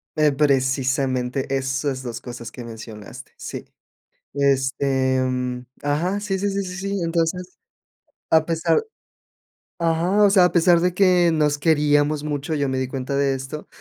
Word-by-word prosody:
Eh, 150 -2 +3
precisamente 135 -1 0
esas 135 0 -2
2 120 -1 -6
cosas 120 -2 -8
que 125 - -9
mencionaste. 110 -2 -10
Sí. - - -7 0.7
Este 135 -1 +1
mm, 125 -1 -2 0.2
ajá, 170 +8 0
sí, 195 -2 -2
sí, 205 +2 0
sí, 200 0 -1
sí. 190 +2 -4
Entonces, 170 +2 -2 0.7
a 160 -1 +4
pesar. 165 - +1 1.0
Ajá, 175 +5 +2
o 200 - +5
sea, 190 -3 +6
a 180 - +2
pesar 170 0 +4
de 180 +1 +1
que 180 -2 +4
nos 150 -2 +2
queríamos 150 -1 +2
mucho, 150 +1 -3
yo 145 -2 0
me 130 - -1
di 130 - -1
cuenta 135 +1 -4
de 140 -1 +2
esto. 135 +3 -7
145 Hz, 150 wpm, -22 LUFS, 130-170 Hz, 1.0 s, sea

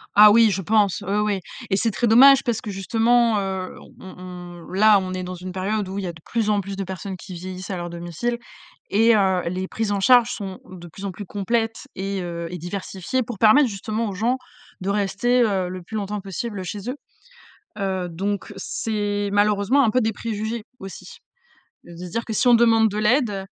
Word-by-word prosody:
Ah 210 0 +9
oui, 225 0 +6
je 195 0 -2
pense! 205 -2 +2
Oui, 200 +2 0
oui. 210 -2 0 0.3
Et 195 - +2
c'est 225 +1 +1
très 235 - 0
dommage 270 +4 +7
parce 235 -4 -1
que 215 - -6
justement, 225 +3 +2
heu, 190 -1 -4 0.2
on 190 - -11
on 175 -1 -10
là 210 +1 +6
on 185 -1 -4
est 185 0 -3
dans 180 0 -6
une 185 +1 -7
période 195 +2 -2
où 195 +1 -5
il - - -4
y - - -3
a 170 - -5
de 160 - -15
plus 225 -2 -1
en 210 - +2
plus 195 +1 -6
de 195 - -3
personnes 190 +1 -6
qui 185 - -10
vieillissent 185 +1 -7
à 190 - -3
leur 175 0 -5
domicile 175 +8 -3 0.5
et 225 +3 +4
heu, 190 -3 +2
les 185 +1 -3
prises 220 -2 -2
en 200 - 0
charge 240 +2 +5
sont 195 -3 -6
de 175 -2 -10
plus 195 +5 -9
en 195 - -3
plus 205 +2 -8
complètes 225 +4 -2
et 195 0 -3
heu, 170 -1 -5
et 180 - -6
diversifiées 190 +6 -3
pour 230 -2 -7
permettre 245 +6 +6
justement 215 +2 -3
aux 200 - -4
gens 230 +7 0 0.4
de 190 - -2
rester, 205 +5 +1
heu, 190 -4 0
le 185 0 -7
plus 220 - -9
longtemps 205 0 -3
possible 195 +1 -5
chez 200 +5 -5
eux. 255 - -3 0.8
Heu, 190 -2 -2
donc 195 +4 -3
c'est 205 -2 -2
malheureusement 205 +6 +3
un 220 - +3
peu 255 - +2
des 220 -1 0
préjugés, 220 +1 -4 0.2
aussi. 195 -3 -10 0.7
Heu, 175 - -12
de - - -12
se - - -9
dire 230 +4 -2
que 225 - -5
si 215 - 0
on 240 - +7
demande 225 -1 +5
de 210 0 -4
l'aide, 215 -3 +1
200 Hz, 220 wpm, -23 LUFS, 185-225 Hz, 0.8 s, Ah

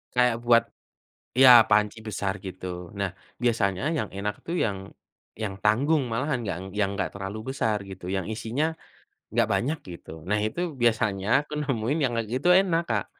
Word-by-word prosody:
kayak 125 -1 +4
buat 115 -1 +6 0.8
iya 130 -1 +9 0.2
panci 105 +1 +3
besar 100 -2 -1
gitu. 95 0 -7 0.3
Nah, 100 -1 -1 0.3
biasanya 105 -6 +1
yang 110 -8 -1
enak 105 +1 -2
tuh 170 - -2
yang 100 -3 -1 0.6
yang 100 -3 -2
tanggung 140 +9 +3
malahan, 130 +4 0
nggang 95 -4 -4 0.2
yang 100 -2 +2
enggak - - -1
terlalu 100 +1 -5 0.2
besar 110 -6 +1
gitu, 95 -2 -10
yang 95 -2 -2
isinya, 115 +6 -2 0.7
nggak - - +3
banyak 150 +6 0
gitu. 85 - -10 0.2
Nah 105 - +2
itu, 110 +10 -3 0.2
biasanya 110 -4 +1
aku 150 - -11
nemuin 135 0 -1
yang 120 - -1
kayak 115 -2 -2
gitu 130 +7 0
enak, 175 -3 +1
Kak. 105 -4 0
110 Hz, 165 wpm, -26 LUFS, 100-130 Hz, 0.8 s, iya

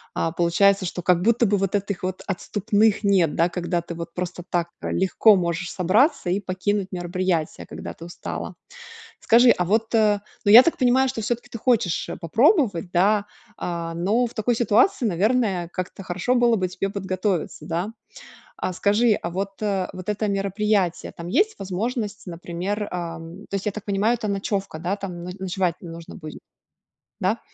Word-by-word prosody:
а, 165 - 0
получается, 185 +4 +3
что 175 0 -4
как 180 -1 +3
будто 230 +3 +3
бы 205 0 +2
вот 195 +1 -1
этих 200 -2 -2
вот 185 0 -3
отступных 205 +3 +1
нет, 190 -6 +3
да, 170 +2 +3
когда 175 -1 -2
ты 170 - -7
вот 170 0 -7
просто 180 -1 -4
так, 170 -1 0
э, - - -3
легко 195 +3 +4
можешь 170 -1 -2
собраться 195 - +2
и 195 - +1
покинуть 190 +1 -1
мероприятие, 175 -2 -2
когда - - -7
ты 165 - -13
устала. 175 - -6 0.7
Скажи, 240 +2 +6
а 180 - +2
вот, 220 +4 0
э, 210 -2 +3 0.3
ну, - - +5
я 240 +4 +12
так 335 - 0
понимаю, 260 +1 +3
что 230 - -5
всё-таки 240 +2 -3
ты 230 - -6
хочешь, 220 -8 +1
э, - - -5
попробовать, 220 - +2
да, 200 +3 +3 0.3
а, 170 -1 -4
но 205 +9 +1
в 230 - -9
такой 235 +2 +1
ситуации, 240 - +3
наверное, 195 -2 +1
как-то 185 +1 -5
хорошо 190 +7 -1
было 240 -2 +4
бы 185 -2 -1
тебе 195 +2 -3
подготовиться, 185 -5 -2
да? 170 +5 -2 0.7
А 185 - -3
скажи, 210 +5 +3
а 170 - -4
вот, 195 +3 -4
э, 195 -3 0
вот 185 +1 -9
это 210 0 -1
мероприятие, 195 -2 0
там 170 0 -8
есть 425 - +2
возможность, 210 +2 -3
например, 180 +4 -4
ам, 170 +2 -6
то - - -6
есть, 195 - -5
я 210 - 0
так 215 0 -8
понимаю, 205 +3 +1
это 220 -3 -3
ночёвка, 195 -3 -2
да, 180 +5 -2
там 180 -4 -6
но 180 - -5
ночевать 185 -2 -1
нужно 165 -1 -9
будет? 155 -2 -8 0.9
Да, - - 0
195 Hz, 180 wpm, -23 LUFS, 175-215 Hz, 0.9 s, я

